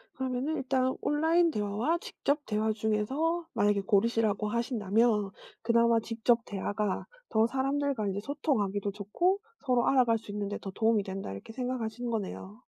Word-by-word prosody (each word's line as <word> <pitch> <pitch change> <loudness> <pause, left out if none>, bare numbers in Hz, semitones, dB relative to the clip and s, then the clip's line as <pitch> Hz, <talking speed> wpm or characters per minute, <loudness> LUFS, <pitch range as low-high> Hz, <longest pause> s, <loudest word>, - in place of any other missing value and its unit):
그러면은 260 +4 -2
일단 260 -1 +1
온라인 325 +3 +3
대화와 210 +10 0
직접 290 -3 -2
대화 215 0 0
중에서 260 +11 0
만약에 205 -1 +2
고르시라고 210 0 +2
하신다면 220 -3 +1 0.3
'그나마 235 0 +4
직접 230 +1 +1
대화가 205 0 -2 0.2
더 220 0 +3
사람들과 270 -3 0
인제 195 0 -1
소통하기도 210 -8 -1
좋고 215 - 0 0.3
서로 250 -2 +2
알아갈 245 -4 +4
수 210 - -10
있는데 205 0 -3
더 195 - -6
도움이 220 0 +2
된다.' 190 - -5
이렇게 100 - -8
생각하시는 245 -1 -3
거네요. 210 0 -5
225 Hz, 375 characters per minute, -30 LUFS, 205-260 Hz, 0.3 s, 그나마